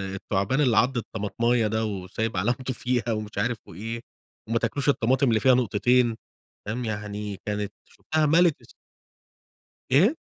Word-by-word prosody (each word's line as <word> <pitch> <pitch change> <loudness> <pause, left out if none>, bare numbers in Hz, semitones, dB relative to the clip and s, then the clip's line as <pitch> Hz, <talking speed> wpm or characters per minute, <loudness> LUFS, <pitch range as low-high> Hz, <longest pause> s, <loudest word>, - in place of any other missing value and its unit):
التعبان 100 +7 0
اللي 125 -6 +3
عَض 125 +2 +3
الطمطماية 115 +1 0
ده 110 +1 0
وسايب 100 +1 -3
علامته 125 +6 0
فيها 120 -1 -1
ومش 105 -2 -4
عارف 115 +3 0
وإيه. 115 +7 -6 0.5
وما 115 0 +2
تاكلوش 135 +5 -1
الطماطم 130 0 +2
اللي 110 -1 +3
فيها 130 +3 +5
نقطتين 120 0 +2 0.5
تمام، 120 +3 -3
يعني 105 -2 -4
كانت 105 -1 -3
شُفتها 155 -1 -1
مَلِت 165 +1 +4
الس - - -17 1.2
إيه؟ 195 - +5
115 Hz, 140 wpm, -26 LUFS, 105-125 Hz, 1.2 s, فيها